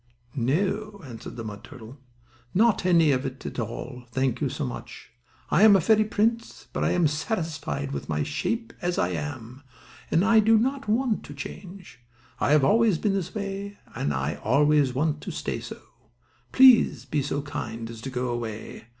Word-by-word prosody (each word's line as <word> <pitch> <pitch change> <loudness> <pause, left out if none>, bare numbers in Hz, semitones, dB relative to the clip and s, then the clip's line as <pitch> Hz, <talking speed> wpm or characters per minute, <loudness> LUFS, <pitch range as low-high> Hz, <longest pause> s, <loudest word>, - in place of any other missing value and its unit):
"No," 200 - -1
answered 120 -4 -9
the 115 - -6
mud 105 -2 -8
turtle, 130 0 -12 0.6
"not 220 -2 +3
any 165 -5 +5
at 130 0 -4
all, 125 +2 -6
thank 130 0 0
you, - - +1
so - - -3
much. - - -8 0.4
I 175 - +4
am 215 -2 +8
a - - +5
fairy 215 +5 +3
prince, 225 +2 -1
but - - -1
I - - +2
am 175 -2 +2
satisfied 150 - -2
with 70 -1 -5
my 75 -1 0
shape 230 - -3
as 175 -1 -1
I 90 - +1
am; 90 - -6 0.5
and 165 +5 +3
I 225 0 +6
do 220 +1 +5
not 265 +3 -1
want 225 +1 +1
to 145 - -10
change. 180 +5 -9 0.4
I - - +1
have 150 -1 +5
always 220 +3 +4
been 200 +4 0
this 190 +1 -3
way, 200 0 -5 0.2
and 70 - -2
I 70 +2 -2
always 145 0 +3
want 150 +2 0
to - - -6
stay - - -3
so. - - -8 0.7
Please 260 -3 +6
be 150 - -1
so 140 +1 -2
kind 115 -5 -5
as 115 -1 -9
to 135 - -5
go 125 -1 -2
away. 115 -2 -6
150 Hz, 175 wpm, -26 LUFS, 125-205 Hz, 0.7 s, am